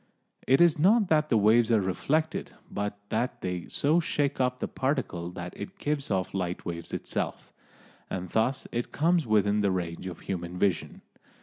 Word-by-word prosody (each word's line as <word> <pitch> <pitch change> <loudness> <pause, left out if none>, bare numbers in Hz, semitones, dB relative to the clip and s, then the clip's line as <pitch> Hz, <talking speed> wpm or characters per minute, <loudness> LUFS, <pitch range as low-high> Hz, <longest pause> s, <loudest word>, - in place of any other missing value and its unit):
It 135 +4 +5
is 170 -3 +5
not 205 +4 +4
that 155 -1 +3
the 115 - +4
waves 110 +3 +4
are 110 - +5
reflected, 145 - -1 0.2
but 105 0 -3
that 115 +3 -1
they 90 -2 -3
so 155 +4 +2
shake 145 -4 0
up 125 0 +1
the - - -3
particle 130 - -2
that 90 0 -6
it 195 +1 -8
gives 145 -5 -2
off 95 -3 -1
light 90 -2 -3
waves 85 -1 -5
itself. - - -4 0.6
And 90 -1 -4
thus 115 +8 0
it 120 0 -3
comes 165 -2 +2
within 105 -1 +3
the 100 - +2
range 90 -1 -3
of 90 -3 -7
human 90 -1 -4
vision. 95 0 0
110 Hz, 175 wpm, -28 LUFS, 95-145 Hz, 0.6 s, It